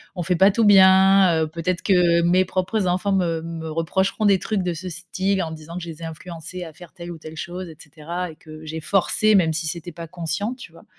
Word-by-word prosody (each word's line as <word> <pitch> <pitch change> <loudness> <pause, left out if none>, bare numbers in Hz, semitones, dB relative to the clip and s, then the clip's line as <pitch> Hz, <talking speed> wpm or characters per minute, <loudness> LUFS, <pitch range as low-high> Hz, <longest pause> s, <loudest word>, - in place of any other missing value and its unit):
«On 175 - -3
fait 180 +1 +1
pas 190 +4 +6
tout 225 +3 +1
bien, 190 -3 +6
heu, 155 - -1
peut-être 170 +3 -3
que 175 -3 +3
mes 180 +2 +4
propres 185 +2 -1
enfants 185 +3 0
me 170 -4 0
me 165 -1 -6
reprocheront 190 +6 -1
des 200 -2 +4
trucs 205 -1 -2
de 175 -1 -1
ce 185 +3 -6
style, 185 +3 -2
en 160 - -5
disant 160 +1 -9
que 180 - -5
je 170 - -7
les 165 0 -10
ai - - -5
influencés 170 +2 -8
à 160 -2 -10
faire 175 0 -14
telle 175 -1 -9
ou 165 - -9
telle 155 0 -10
chose 180 +1 -6
et 160 - -11
cetera 165 +3 -6
et 155 - -15
que 155 0 -13
j'ai 160 +1 -6
forcé, 200 +5 +2
même 165 -4 +3
si 160 +1 -3
c'était 170 +2 -5
pas 165 +1 -9
conscient», 175 +7 -3
tu 250 - -12
vois - - -17
175 Hz, 245 wpm, -22 LUFS, 165-190 Hz, -, pas